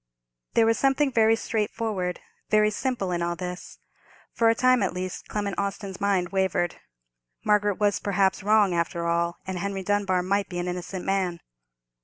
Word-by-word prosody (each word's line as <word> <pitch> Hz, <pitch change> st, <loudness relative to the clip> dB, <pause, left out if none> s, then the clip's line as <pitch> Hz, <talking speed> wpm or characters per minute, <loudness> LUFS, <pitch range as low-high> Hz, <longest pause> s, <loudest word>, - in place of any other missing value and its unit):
There 230 Hz, -, +5 dB
was 225 Hz, 0 st, +2 dB
something 275 Hz, +1 st, +2 dB
very 225 Hz, -2 st, +4 dB
straightforward, 210 Hz, -5 st, -2 dB, 0.3 s
very 215 Hz, 0 st, +4 dB
simple, 230 Hz, -5 st, -2 dB
in 175 Hz, -1 st, -1 dB
all 170 Hz, 0 st, -1 dB
this. 180 Hz, +1 st, -7 dB, 0.6 s
For 230 Hz, -1 st, +3 dB
a 225 Hz, -, +3 dB
time, 255 Hz, 0 st, +4 dB
at 190 Hz, -2 st, -1 dB
least, 185 Hz, 0 st, -5 dB
Clement 205 Hz, -2 st, -3 dB
Austin's 200 Hz, -1 st, -4 dB
mind 195 Hz, -3 st, +1 dB
wavered. 190 Hz, -2 st, 0 dB, 0.7 s
Margaret 205 Hz, -1 st, +3 dB
was, 205 Hz, -1 st, +2 dB
perhaps, 195 Hz, -1 st, +1 dB
wrong, 205 Hz, -2 st, +4 dB
after 170 Hz, 0 st, -1 dB
all, 170 Hz, 0 st, 0 dB
and 190 Hz, -1 st, -4 dB
Henry 195 Hz, 0 st, -3 dB
Dunbar 195 Hz, -2 st, +1 dB
might 200 Hz, +1 st, 0 dB
be 175 Hz, -, -5 dB
an 175 Hz, 0 st, -2 dB
innocent 180 Hz, +1 st, -5 dB
man. 185 Hz, -3 st, 0 dB
195 Hz, 165 wpm, -26 LUFS, 180-210 Hz, 0.7 s, There